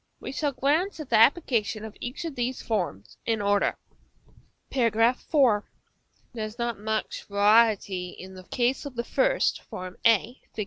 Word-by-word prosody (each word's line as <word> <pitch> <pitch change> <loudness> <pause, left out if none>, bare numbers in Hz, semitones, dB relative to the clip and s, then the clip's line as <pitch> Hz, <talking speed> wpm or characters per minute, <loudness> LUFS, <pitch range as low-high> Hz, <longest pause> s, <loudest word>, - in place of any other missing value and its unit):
We - - -6
shall 290 +1 -1
glance 310 +8 0
at 300 -5 -8
the 225 - +5
applications 225 -4 +3
of 220 - -9
each 245 +7 -5
of 325 - -4
these 250 0 -2
forms 175 - -3
in 225 -1 0
order. 205 0 +1 0.9
§ - - -9 0.4
IV. 255 -5 +2 0.7
There 225 -2 -4
is 215 +1 -9
not 235 -3 -2
much 220 +1 -3
variety 205 -3 +3
in 185 +1 -11
the 185 -1 -12
case 250 +6 0
of 270 - -10
the 235 - -2
first, - - +1 0.4
a, 230 +2 +3
Fig. - - -8
230 Hz, 160 wpm, -26 LUFS, 205-260 Hz, 0.9 s, the